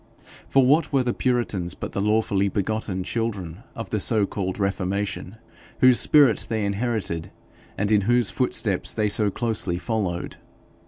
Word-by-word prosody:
For 135 -1 +4
what 150 +4 +3
were 135 -3 +2
the 120 -1 -1
puritans 115 -9 -1
but - - -6
the 100 - -2
lawfully 105 -2 +1
begotten 100 -2 -2
children 100 -5 -4
of 115 - -7
the 110 - 0
so 105 0 +2
called 95 -2 -4
reformation, 100 +1 -3 0.4
whose 130 -1 +6
spirit 145 -7 +4
they 110 -3 -1
inherited, 100 -5 -2 0.5
and 100 +1 -1
in 105 -1 +4
whose 120 +1 +2
footsteps 115 -6 0
they 105 -2 +1
so 105 -1 +2
closely 105 -5 -1
followed? 95 -4 -3
105 Hz, 150 wpm, -24 LUFS, 95-120 Hz, 0.5 s, whose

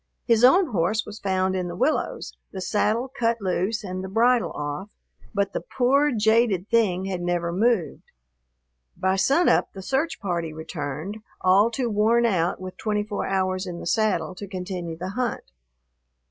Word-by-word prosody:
His 230 -1 +3
own 315 +4 +6
horse 215 +3 0
was 210 +1 -9
found 190 -1 0
in 180 -1 -2
the 175 - -6
willows, 305 - -1 0.2
the 190 - -6
saddle 215 +5 0
cut 230 -2 +1
loose 200 +3 -1
and 185 -1 -5
the 190 - -5
bridle 235 +4 +3
off, 145 +7 -4 0.4
but 200 -2 -1
the - - -2
poor, 275 +4 +2
jaded 220 -4 +2
thing 195 -6 +2
had 185 -2 -3
never 175 -1 -1
moved. 205 -5 +1 1.0
By 190 0 +1
sunup 275 - +3
the 190 - -8
search 270 - -1
party 170 -5 -2
returned, 155 +4 -5 0.2
all 195 +4 +5
too 240 +1 -2
worn 225 +2 +3
out 180 -6 +1
with 185 0 -8
twenty 210 -1 -1
four 210 -1 -3
hours 185 0 0
in 175 -1 -5
the - - -8
saddle 185 -3 +1
to 200 +2 -8
continue 180 -3 -5
the 180 +3 -5
hunt. 235 - -3
195 Hz, 165 wpm, -24 LUFS, 180-230 Hz, 1.0 s, own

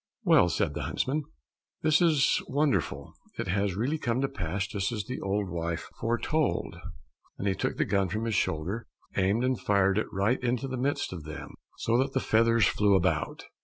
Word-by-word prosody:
"Well," - - +5
said - - 0
the - - -4
huntsman, 145 +3 -1 0.6
"this 155 +2 +4
is 155 -5 +4
wonderful, 145 +1 0 0.2
it - - -3
has 100 0 0
really 135 +10 -1
come 120 -1 0
to 135 - +2
pass 95 -3 -3
just 100 +1 -2
as 105 -3 -2
the 125 +5 -5
old 100 +1 -1
wife 85 -1 -3
foretold!" 120 - 0 0.6
and 100 - -2
he 95 - +3
took - - -2
the - - +2
gun 100 -2 +1
from 110 +4 -2
his 115 - -1
shoulder, 95 +7 -1 0.3
aimed 100 +5 +2
and 130 -2 +1
fired 100 +1 +3
right 100 +7 +1
into 125 +2 0
the 130 - -3
midst 140 -7 -1
of 85 -4 -7
them, 75 +1 -8 0.2
so 115 +2 +1
that 135 +1 0
the 130 - +2
feathers 115 -1 +3
flew 105 -1 +3
about. 95 - 0
110 Hz, 185 wpm, -28 LUFS, 95-130 Hz, 0.6 s, Well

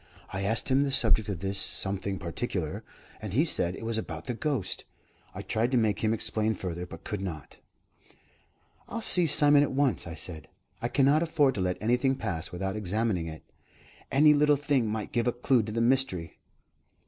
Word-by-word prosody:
I 95 - -3
asked 110 +7 +1
him 135 +1 +3
the 140 - +1
subject 110 -5 +3
of 90 -4 -4
this 95 0 0
'something 95 0 0
particular,' 85 -3 -4 0.4
and 105 -3 -6
he 145 +8 +3
said 90 - +1
it 115 - -8
was 115 -1 0
about 80 -6 -7
the 125 - -3
ghost. 120 -6 -2 0.5
I - - -6
tried 115 +2 0
to - - +4
make 110 -3 +1
him 110 - +2
explain 110 0 0
further, 90 -1 -5
but 85 -2 -11
could 105 -4 -4
not." 80 -7 -7 1.3
"I'll 230 -1 -4
see 180 -5 +5
Simon 145 -1 +5
at 145 - 0
once," 130 -10 0
I 80 - -6
said. 80 -1 -3 0.3
"I 120 - 0
cannot 140 +4 +3
afford 150 -5 +2
to 100 - -3
let 90 0 -1
anything 125 +5 +1
pass 80 -9 -4
without 95 +2 -3
examining 105 -3 -1
it. 80 -1 -9 0.7
Any 150 +2 +6
little 150 0 +4
thing 140 -4 0
might 110 0 -4
give 120 0 0
a - - +3
clue 120 +1 +2
to 110 0 -6
the 115 +2 -1
mystery." 115 -10 0
110 Hz, 190 wpm, -28 LUFS, 95-135 Hz, 1.3 s, Any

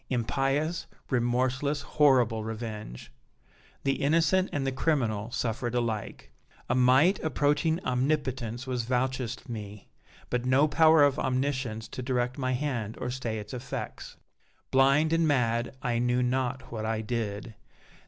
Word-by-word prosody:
impious, 135 +7 0 0.2
remorseless, 130 +4 0
horrible 125 -7 +3
revenge! 110 - -6 0.7
The 135 0 0
innocent 165 +6 +3
and 140 -2 -2
the 135 - 0
criminal 120 -7 0
suffered 120 -1 -2
alike. 115 -4 -3 0.4
A - - +1
might 130 +9 +4
approaching 150 +2 +1
omnipotence 130 -2 -1
was 125 -3 -2
vouchsafed 130 0 -2
me, 105 -3 -8 0.4
but 125 0 0
no 130 +4 +4
power 160 0 +5
of 140 -2 +3
omniscience 130 -4 -1
to - - -6
direct 125 +1 -1
my 130 -1 0
hand 125 -5 -2
or 125 - -3
stay 120 -3 -3
its 105 +2 -7
effects. 125 0 -6 0.5
Blind 140 +4 +4
and 165 -1 +3
mad 120 -3 0
I 120 -1 0
knew 125 +1 +1
not 130 0 -1
what 110 -2 -4
I 110 0 -1
did. 110 -1 -4
125 Hz, 135 wpm, -28 LUFS, 115-140 Hz, 0.7 s, power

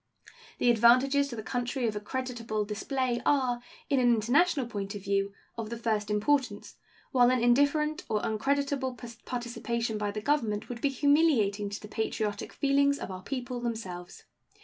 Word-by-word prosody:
The 245 - +4
advantages 255 +5 +4
to 255 - -6
the 220 - -6
country 245 +2 -2
of 215 - -2
a - - -2
creditable 230 -2 -3
display 240 +4 -2
are, 255 -4 +2 0.3
in 275 - +2
an 245 -1 +4
international 270 +6 +2
point 205 -3 -5
of 200 - -7
view, 195 0 0 0.3
of 220 -1 -4
the 235 - -4
first 215 -2 -1
importance, 250 +6 0 0.4
while 245 -2 +5
an 255 0 +2
indifferent 285 +5 +3
or 215 - +1
uncreditable 270 +3 -1 0.3
participation 235 -2 -3
by 205 -1 -1
the 210 +1 -4
Government 220 -5 0
would 240 -1 -6
be 285 - +2
humiliating 270 -8 +2
to 200 - -5
the 210 - -10
patriotic 215 -1 -3
feelings 280 0 +2
of 195 - -6
our 185 0 -7
people 250 +2 -4
themselves. 190 -7 -5
240 Hz, 165 wpm, -29 LUFS, 215-270 Hz, 0.4 s, while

